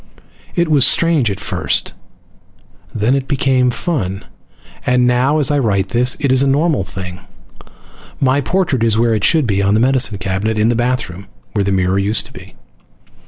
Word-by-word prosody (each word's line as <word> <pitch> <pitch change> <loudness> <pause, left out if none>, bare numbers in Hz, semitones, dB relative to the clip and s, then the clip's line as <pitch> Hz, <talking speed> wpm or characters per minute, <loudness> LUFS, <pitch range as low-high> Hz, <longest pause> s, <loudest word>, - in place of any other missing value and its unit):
It 170 -1 +1
was 150 -4 +3
strange 160 -8 +2
at 100 - -4
first, - - -1 1.0
then 110 +3 0
it 135 -1 -1
became 130 -3 +1
fun, 110 - -3 0.6
and 125 0 +2
now, 125 +4 +2
as 150 -2 +2
I 145 - +1
write 100 -6 0
this, 125 +6 +2
it 140 -3 0
is 130 0 +3
a 140 - +2
normal 145 - +1
thing. 95 -1 -8 1.0
My 135 +1 +2
portrait 170 -6 -1
is 110 -2 +2
where 115 0 +2
it 105 -2 -2
should 155 +3 +3
be 100 -3 0
on 100 +1 +2
the - - +2
medicine 125 -3 +2
cabinet 95 +3 -2
in 110 +2 +2
the 120 - +1
bathroom, 115 -6 -3 0.2
where 105 - -1
the 100 - -1
mirror 95 0 +1
used 100 +3 0
to - - -13
be. - - -13
120 Hz, 180 wpm, -16 LUFS, 100-135 Hz, 1.0 s, was